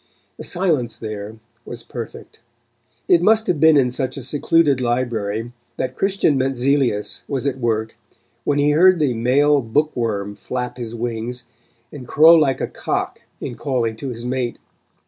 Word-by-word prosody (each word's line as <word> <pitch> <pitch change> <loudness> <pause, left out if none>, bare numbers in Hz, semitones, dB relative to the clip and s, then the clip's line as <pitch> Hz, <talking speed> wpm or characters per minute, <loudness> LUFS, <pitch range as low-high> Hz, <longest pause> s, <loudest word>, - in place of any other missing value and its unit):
The - - -8
silence 160 -10 -1
there 110 -1 -6 0.3
was 120 -1 -8
perfect. 115 -1 -9 0.7
It 170 - +5
must 220 +4 +4
have 170 -5 0
been 160 0 +6
in 125 -3 +3
such 130 +1 -3
a 135 - -6
secluded 145 0 +2
library 120 -2 -2 0.3
that 130 0 -3
Christian 195 -8 +1
Mentzelius 130 -4 0
was 140 -1 -3
at 135 -2 -1
work 110 -2 -1 0.5
when 145 - 0
he 145 +1 +3
heard 180 +4 +5
the 145 -6 +1
male 140 +5 +3
book 145 +7 0
worm 105 -4 -2
flap 125 +3 -5
his 120 -2 -6
wings, 120 +1 -4 0.5
and 130 -4 -9
crow 160 +6 +7
like 150 -6 +3
a - - 0
cock - - -3 0.2
in 125 - -5
calling 120 -4 -2
to 135 - -5
his 120 -1 -7
mate. 125 -1 -2
130 Hz, 160 wpm, -20 LUFS, 115-145 Hz, 0.7 s, crow